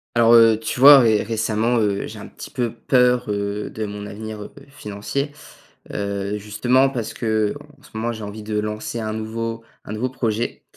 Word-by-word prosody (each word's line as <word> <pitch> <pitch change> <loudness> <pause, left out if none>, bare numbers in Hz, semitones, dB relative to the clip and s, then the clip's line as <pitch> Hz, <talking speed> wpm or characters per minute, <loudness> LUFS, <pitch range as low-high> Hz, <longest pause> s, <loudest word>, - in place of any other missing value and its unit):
Alors, 115 0 +5
heu, 115 -2 +7
tu 110 +2 -4
vois 140 +1 +10
ré 110 -3 +4
récemment, 115 +2 0
heu, 100 -2 0
j'ai - - -9
un - - -9
petit - - -10
peu 120 -3 -2
peur, 125 -1 +2
heu, 100 0 -2
de 110 - -4
mon 105 0 -6
avenir, 110 +1 -7
heu, - - -9 0.2
financier. 130 +3 -4 0.6
Heu, 100 0 -2
justement 120 +6 +2
parce 120 -5 -4
qu'en 110 +1 0 0.3
ce 150 - -17
moment 115 +2 -1
j'ai 110 -1 -8
envie 105 +1 -7
de 105 0 -3
lancer 105 +2 -4
un 110 -1 -3
nouveau 115 +1 -4 0.2
un 105 - -6
nouveau 120 +4 -2
projet. 120 -2 -2
110 Hz, 185 wpm, -21 LUFS, 105-120 Hz, 0.6 s, vois